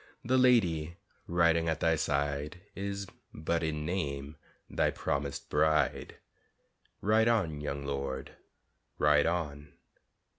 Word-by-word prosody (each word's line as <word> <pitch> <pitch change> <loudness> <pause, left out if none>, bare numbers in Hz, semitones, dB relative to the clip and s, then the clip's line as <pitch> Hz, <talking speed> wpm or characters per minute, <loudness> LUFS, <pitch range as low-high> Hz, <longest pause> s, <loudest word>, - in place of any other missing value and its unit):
The 130 +2 +3
lady 85 -10 +3 0.3
riding 85 -1 +3
at 80 - -1
thy 80 0 +3
side 75 +2 -1
Is 100 0 -4 0.3
but 80 +2 -1
in 75 -2 -2
name 75 -4 -3 0.3
thy - - +1
promised 70 0 -3
bride, 80 0 +1 0.9
Ride 110 +2 +3
on, 90 -11 +1
young 70 -1 -4
lord, 70 -1 -3 0.7
ride 75 +1 +4
on! 75 -4 -3
80 Hz, 110 wpm, -31 LUFS, 70-90 Hz, 0.9 s, ride